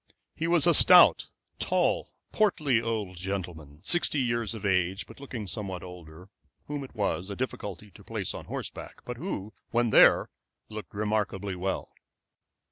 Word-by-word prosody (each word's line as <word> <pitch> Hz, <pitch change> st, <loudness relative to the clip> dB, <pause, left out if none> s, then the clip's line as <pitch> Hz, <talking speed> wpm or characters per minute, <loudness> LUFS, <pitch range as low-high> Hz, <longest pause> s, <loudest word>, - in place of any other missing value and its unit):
He 165 Hz, -, -2 dB
was 170 Hz, -3 st, +5 dB
a 170 Hz, -, +5 dB
stout, 180 Hz, +2 st, +7 dB, 0.3 s
tall, -, -, +1 dB, 0.2 s
portly 150 Hz, -, +2 dB
old 110 Hz, -5 st, -3 dB
gentleman, 85 Hz, -5 st, -5 dB
sixty 175 Hz, -4 st, +2 dB
years 120 Hz, -3 st, 0 dB
of 105 Hz, -1 st, -7 dB
age, 95 Hz, 0 st, +1 dB
but -, -, -14 dB
looking 130 Hz, -6 st, -6 dB
somewhat 95 Hz, -3 st, -4 dB
older, 90 Hz, -1 st, -11 dB, 0.4 s
whom 145 Hz, -1 st, -4 dB
it 130 Hz, -, -12 dB
was 95 Hz, -3 st, -1 dB
a 100 Hz, -, -4 dB
difficulty 105 Hz, -5 st, -5 dB
to -, -, -16 dB
place -, -, -3 dB
on -, -, -8 dB
horseback, -, -, -7 dB
but 125 Hz, -1 st, -5 dB
who, 110 Hz, -, -5 dB, 0.2 s
when 120 Hz, 0 st, +1 dB
there, -, -, +6 dB, 0.4 s
looked 105 Hz, -2 st, -8 dB
remarkably 105 Hz, -2 st, -1 dB
well. 95 Hz, +2 st, -3 dB
105 Hz, 150 wpm, -28 LUFS, 95-125 Hz, 0.4 s, stout